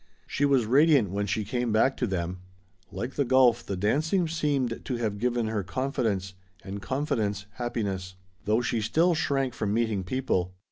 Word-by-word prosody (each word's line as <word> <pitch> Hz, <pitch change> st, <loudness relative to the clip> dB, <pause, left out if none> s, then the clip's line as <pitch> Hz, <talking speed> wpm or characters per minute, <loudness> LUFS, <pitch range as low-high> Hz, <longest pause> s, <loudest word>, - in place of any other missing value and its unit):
She 145 Hz, -, 0 dB
was 135 Hz, -5 st, +3 dB
radiant 135 Hz, -, +4 dB
when 100 Hz, +1 st, -1 dB
she 105 Hz, +3 st, -1 dB
came 120 Hz, +2 st, -1 dB
back 115 Hz, +5 st, +3 dB
to 125 Hz, -, 0 dB
them. 90 Hz, -1 st, -3 dB, 0.5 s
Like 120 Hz, +3 st, -4 dB
the 145 Hz, -, +1 dB
golf, 125 Hz, -2 st, +4 dB
the 100 Hz, -, -4 dB
dancing 155 Hz, -, +1 dB
seemed 145 Hz, -7 st, -1 dB
to 130 Hz, -, -3 dB
have 110 Hz, -4 st, -2 dB
given 120 Hz, 0 st, 0 dB
her 110 Hz, -2 st, -1 dB
confidence 105 Hz, -3 st, -2 dB, 0.3 s
and 100 Hz, +1 st, -6 dB
confidence, 115 Hz, -7 st, -1 dB
happiness. 100 Hz, -6 st, -3 dB, 0.3 s
Though 110 Hz, +3 st, +2 dB
she 115 Hz, -1 st, -1 dB
still 165 Hz, +11 st, +3 dB
shrank 135 Hz, -5 st, 0 dB
from 105 Hz, -2 st, -1 dB
meeting 110 Hz, -4 st, 0 dB
people. 95 Hz, -5 st, -1 dB
115 Hz, 170 wpm, -27 LUFS, 100-135 Hz, 0.5 s, radiant